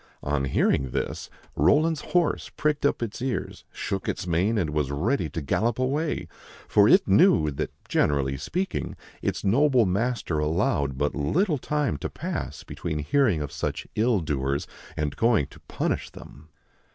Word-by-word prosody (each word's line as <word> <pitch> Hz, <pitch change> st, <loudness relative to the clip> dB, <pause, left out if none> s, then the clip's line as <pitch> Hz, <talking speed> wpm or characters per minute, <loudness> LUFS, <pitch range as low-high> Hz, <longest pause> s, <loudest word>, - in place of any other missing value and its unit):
On 70 Hz, -1 st, 0 dB
hearing 65 Hz, 0 st, +1 dB
this, -, -, -3 dB, 0.3 s
Roland's 155 Hz, +1 st, +3 dB
horse 175 Hz, -4 st, 0 dB
pricked 150 Hz, -1 st, +1 dB
up 130 Hz, -, -1 dB
its 115 Hz, +1 st, -5 dB
ears, 130 Hz, -1 st, -3 dB
shook 95 Hz, -1 st, -3 dB
its -, -, -3 dB
mane, 90 Hz, +6 st, +1 dB
and 85 Hz, -7 st, 0 dB
was 75 Hz, -3 st, 0 dB
ready 85 Hz, -, 0 dB
to 80 Hz, +2 st, -5 dB
gallop 110 Hz, -, 0 dB
away; 130 Hz, -, -1 dB, 0.4 s
for -, -, +5 dB
it -, -, +5 dB
knew 75 Hz, -1 st, +5 dB
that, 70 Hz, -, -3 dB, 0.2 s
generally 70 Hz, -2 st, +1 dB
speaking, 185 Hz, -, -3 dB, 0.3 s
its -, -, -2 dB
noble 125 Hz, +3 st, +4 dB
master 100 Hz, -4 st, 0 dB
allowed 75 Hz, -3 st, 0 dB
but 75 Hz, +1 st, 0 dB
little 150 Hz, -, +1 dB
time 145 Hz, -, -1 dB
to -, -, -4 dB
pass -, -, -5 dB
between 80 Hz, -3 st, -4 dB
hearing 90 Hz, -, +2 dB
of 75 Hz, -, -6 dB
such -, -, -3 dB
ill 110 Hz, -2 st, +2 dB
doers 70 Hz, -2 st, -1 dB, 0.3 s
and 75 Hz, -2 st, -1 dB
going 115 Hz, -, +3 dB
to 70 Hz, -, -16 dB
punish -, -, -2 dB
them. 75 Hz, +3 st, -13 dB
90 Hz, 155 wpm, -26 LUFS, -, 0.4 s, for